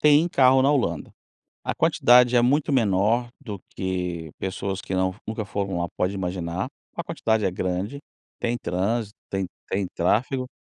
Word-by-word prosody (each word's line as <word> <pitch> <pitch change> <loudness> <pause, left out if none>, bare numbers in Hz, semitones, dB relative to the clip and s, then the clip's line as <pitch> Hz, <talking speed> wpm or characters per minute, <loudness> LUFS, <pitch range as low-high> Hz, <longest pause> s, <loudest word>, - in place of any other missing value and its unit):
têm 150 +3 +5
carro 130 -4 +5
na 140 - +4
Holanda. 120 - 0 0.5
A - - -1
quantidade 125 0 +5
é 120 - +5
muito 140 +4 +2
menor 115 0 +2
do 105 -8 -6
que 90 -4 -3
pessoas 95 0 -3
que 95 - -5
não 95 0 +1
nunca 110 0 -3
foram 100 -3 -2
lá 85 - -1
pode 90 +2 0
imaginar, 90 -1 -3 0.3
ou - - -2
a - - -5
quantidade 110 -1 0
é - - +2
grande, 95 +8 -2 0.4
tem 120 0 -1
trânsito, 105 +4 -1 0.2
tem 95 -1 -2 0.2
tem 95 0 0
tráfego? 125 +9 +1
100 Hz, 165 wpm, -25 LUFS, 95-125 Hz, 0.5 s, têm